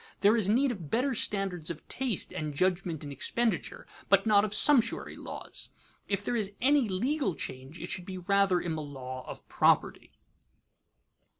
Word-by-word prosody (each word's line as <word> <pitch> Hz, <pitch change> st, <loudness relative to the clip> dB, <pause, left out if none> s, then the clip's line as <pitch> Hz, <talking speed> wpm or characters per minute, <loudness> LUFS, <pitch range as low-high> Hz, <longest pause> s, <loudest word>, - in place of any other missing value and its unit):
There 205 Hz, +3 st, +6 dB
is 210 Hz, -4 st, +1 dB
need 255 Hz, +5 st, +3 dB
of 175 Hz, -10 st, -7 dB
better 255 Hz, -, +1 dB
standards 195 Hz, -7 st, -1 dB
of 170 Hz, -, -7 dB
taste 255 Hz, -7 st, -1 dB
and 150 Hz, -2 st, -4 dB
judgment 175 Hz, -2 st, 0 dB
in 145 Hz, -, -6 dB
expenditure, 230 Hz, -, -1 dB, 0.2 s
but -, -, +5 dB
not 205 Hz, -2 st, +5 dB
of 215 Hz, -, -1 dB
sumptuary 235 Hz, +1 st, +3 dB
laws. -, -, -5 dB, 0.4 s
If 200 Hz, 0 st, -2 dB
there 245 Hz, -, 0 dB
is 205 Hz, -3 st, -1 dB
any 275 Hz, -3 st, +3 dB
legal 245 Hz, -, 0 dB
change, 130 Hz, +6 st, -5 dB
it -, -, -5 dB
should 180 Hz, 0 st, -4 dB
be 190 Hz, -1 st, -5 dB
rather 195 Hz, 0 st, +2 dB
in 170 Hz, -2 st, -3 dB
the 155 Hz, -, -3 dB
law 130 Hz, -3 st, -7 dB
of -, -, -9 dB
property. -, -, +2 dB
195 Hz, 170 wpm, -30 LUFS, 165-230 Hz, 0.4 s, There